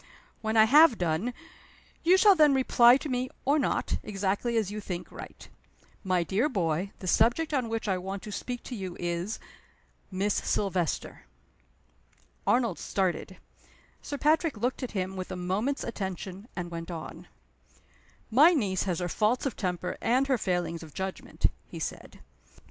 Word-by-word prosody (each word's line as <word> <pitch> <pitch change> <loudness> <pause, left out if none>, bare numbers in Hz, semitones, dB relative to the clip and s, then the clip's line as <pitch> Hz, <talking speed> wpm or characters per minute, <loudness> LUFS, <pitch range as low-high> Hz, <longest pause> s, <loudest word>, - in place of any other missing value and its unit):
When 220 0 0
I 220 - +9
have 285 +2 +7
done, 175 +7 0 0.7
you 355 +3 +5
shall 405 +1 +7
then 300 -5 +5
reply 250 -1 +6
to 300 - -6
me 255 -1 -1 0.2
or 285 +3 +3
not, 270 - 0
exactly 205 +3 -1
as 210 -3 0
you 210 0 -5
think 180 -3 -6
right. - - -10 0.6
My 185 -3 +1
dear 205 - +1
boy, 180 - -1
the - - -9
subject 240 - +2
on 255 -5 0
which 225 -1 -3
I 190 -2 +1
want 190 +2 -5
to 210 - -7
speak 245 +4 -5
to 250 - -6
you 190 -4 -6
is 175 +4 -2 0.7
Miss 195 +2 0
Silvester." 185 -5 -1 1.2
Arnold 235 -7 +2
started. 185 -1 -2 0.6
Sir 285 - -5
Patrick 310 -2 +2
looked 245 +6 -1
at 255 - -5
him 185 +1 -2
with 185 -1 -5
a - - -3
moment's 195 +10 -1
attention, 190 -1 -5
and 175 -2 -5
went 165 0 -6
on: 165 -2 -7 1.0
"My 305 +9 +7
niece 195 - 0
has 180 -3 -1
her 175 - -1
faults 215 - +1
of 275 - -1
temper 180 -2 -3
and 255 +4 +2
her 265 -3 +1
failings 175 -4 -1
of 160 -3 -12
judgment," 190 0 -5 0.2
he - - -9
said. - - -6
205 Hz, 160 wpm, -28 LUFS, 185-250 Hz, 1.2 s, I